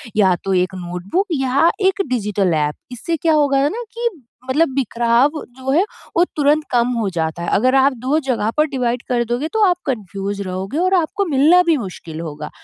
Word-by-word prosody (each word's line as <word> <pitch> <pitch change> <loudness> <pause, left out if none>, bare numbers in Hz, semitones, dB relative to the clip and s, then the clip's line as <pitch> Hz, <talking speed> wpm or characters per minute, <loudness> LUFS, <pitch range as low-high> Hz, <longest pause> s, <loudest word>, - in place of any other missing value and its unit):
या 190 -4 +4
तो 195 - -1
एक 185 +1 +1
नोटबुक 180 - -3
या 275 +2 +2 0.2
एक 385 +1 +1
डिजिटल 205 -7 0
एप। 150 -1 0 0.2
इससे 250 +7 -3
क्या 320 +1 +2
होगा 285 -3 +3
ना 470 +7 -5
कि 470 +1 -1 0.4
मतलब 305 +5 +3
बिखराव 240 0 +2 0.3
जो 260 +1 -2
है 325 +7 +4 0.3
वो 345 - +6
तुरंत 295 +1 +2
कम 240 -1 +3
हो 220 -4 0
जाता 165 -1 -3
है। - - -2
अगर 255 +4 +2
आप 270 +1 +4
2 295 +4 +2
जगह 230 -4 0
पर 305 - +4
डिवाइड 250 -4 -1
कर 240 -1 +1
दोगे 250 +6 -1
तो 440 -1 +2
आप 360 -2 +3
कन्फ्यूज 200 -4 -3
रहोगे 190 +8 -4
और 370 +2 +1
आपको 365 +3 +1
मिलना 315 +3 +5
भी 335 -3 +2
मुश्किल 175 - -7
होगा। 150 -2 -6
255 Hz, 195 wpm, -19 LUFS, 195-305 Hz, 0.4 s, वो